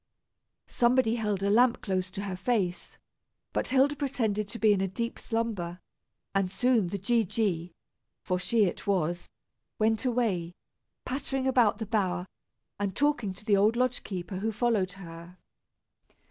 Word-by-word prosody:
Somebody 240 Hz, -1 st, +2 dB
held 210 Hz, -4 st, -1 dB
a 200 Hz, -, +2 dB
lamp 240 Hz, +2 st, +4 dB
close 185 Hz, -2 st, -1 dB
to 200 Hz, +1 st, -6 dB
her 195 Hz, -2 st, -3 dB
face, 190 Hz, -3 st, -1 dB, 0.6 s
but -, -, 0 dB
Hilda 275 Hz, +2 st, +3 dB
pretended 225 Hz, -8 st, -1 dB
to 210 Hz, -, -7 dB
be 215 Hz, -2 st, +5 dB
in 195 Hz, -, 0 dB
a 195 Hz, -, +1 dB
deep 235 Hz, +5 st, -4 dB
slumber, 210 Hz, -7 st, -2 dB, 0.5 s
and 195 Hz, -2 st, +1 dB
soon 235 Hz, -1 st, +2 dB
the 200 Hz, -, -3 dB
G. 230 Hz, +4 st, +2 dB
G., 180 Hz, -5 st, -1 dB, 0.5 s
for 180 Hz, 0 st, -1 dB
she 220 Hz, +4 st, +2 dB
it 180 Hz, -, -4 dB
was, 175 Hz, -3 st, 0 dB, 0.5 s
went 220 Hz, 0 st, +2 dB
away, 215 Hz, -9 st, 0 dB, 0.5 s
pattering 270 Hz, 0 st, -2 dB
about 250 Hz, -5 st, +3 dB
the 220 Hz, -, -4 dB
bower, 185 Hz, -4 st, 0 dB, 0.5 s
and 200 Hz, -2 st, -2 dB
talking 290 Hz, -8 st, +1 dB
to 185 Hz, +3 st, -11 dB
the 210 Hz, -3 st, +4 dB
old 210 Hz, +3 st, +4 dB
lodge 250 Hz, 0 st, +1 dB
keeper, 185 Hz, -1 st, -5 dB
who 220 Hz, +4 st, -1 dB
followed 210 Hz, -4 st, +1 dB
her. 170 Hz, -1 st, -11 dB
210 Hz, 155 wpm, -29 LUFS, 185-235 Hz, 0.6 s, be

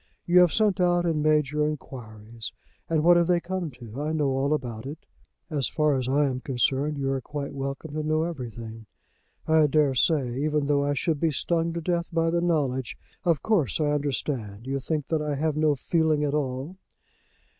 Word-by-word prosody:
You 175 Hz, +1 st, +5 dB
have 180 Hz, -2 st, +6 dB
sent 210 Hz, -3 st, +2 dB
out 175 Hz, -1 st, +3 dB
and 160 Hz, -3 st, +1 dB
made 150 Hz, -2 st, +3 dB
your 150 Hz, 0 st, +1 dB
inquiries, 115 Hz, -6 st, -7 dB, 0.4 s
and 160 Hz, -2 st, +2 dB
what 175 Hz, +1 st, +7 dB
have 170 Hz, -1 st, +3 dB
they 175 Hz, -1 st, +3 dB
come 180 Hz, -1 st, -3 dB
to? 120 Hz, -1 st, -9 dB
I 155 Hz, +1 st, -1 dB
know 150 Hz, -3 st, +1 dB
all 135 Hz, +2 st, 0 dB
about 125 Hz, -5 st, -2 dB
it." 150 Hz, +4 st, -8 dB, 0.5 s
"As 140 Hz, -5 st, 0 dB
far 150 Hz, -1 st, +1 dB
as 130 Hz, -1 st, -1 dB
I 145 Hz, +2 st, +3 dB
am 130 Hz, -2 st, -2 dB
concerned 135 Hz, +3 st, 0 dB
you 135 Hz, -1 st, -1 dB
are 135 Hz, -1 st, -1 dB
quite 145 Hz, +2 st, -5 dB
welcome 140 Hz, +2 st, -5 dB
to 155 Hz, -, -2 dB
know 155 Hz, +1 st, +1 dB
everything." 115 Hz, -8 st, -6 dB, 0.6 s
"I 160 Hz, -1 st, +5 dB
dare 145 Hz, -2 st, +3 dB
say; 130 Hz, -2 st, +1 dB
even 150 Hz, -1 st, +1 dB
though 140 Hz, 0 st, +2 dB
I 145 Hz, 0 st, 0 dB
should 155 Hz, 0 st, 0 dB
be 165 Hz, -, +2 dB
stung 165 Hz, +3 st, 0 dB
to 170 Hz, -, -3 dB
death 170 Hz, 0 st, -1 dB
by 165 Hz, -1 st, +1 dB
the 170 Hz, 0 st, +1 dB
knowledge. 140 Hz, -7 st, 0 dB, 0.3 s
Of 165 Hz, -4 st, +2 dB
course 200 Hz, -, +1 dB
I 150 Hz, -1 st, +2 dB
understand. 130 Hz, -7 st, -2 dB
You 135 Hz, +1 st, -2 dB
think 150 Hz, +1 st, -2 dB
that 160 Hz, -2 st, +1 dB
I 150 Hz, -1 st, -1 dB
have 155 Hz, +1 st, 0 dB
no 155 Hz, -1 st, +3 dB
feeling 155 Hz, +2 st, +1 dB
at 145 Hz, -1 st, 0 dB
all." 140 Hz, +4 st, -2 dB
150 Hz, 200 wpm, -26 LUFS, 135-160 Hz, 0.6 s, what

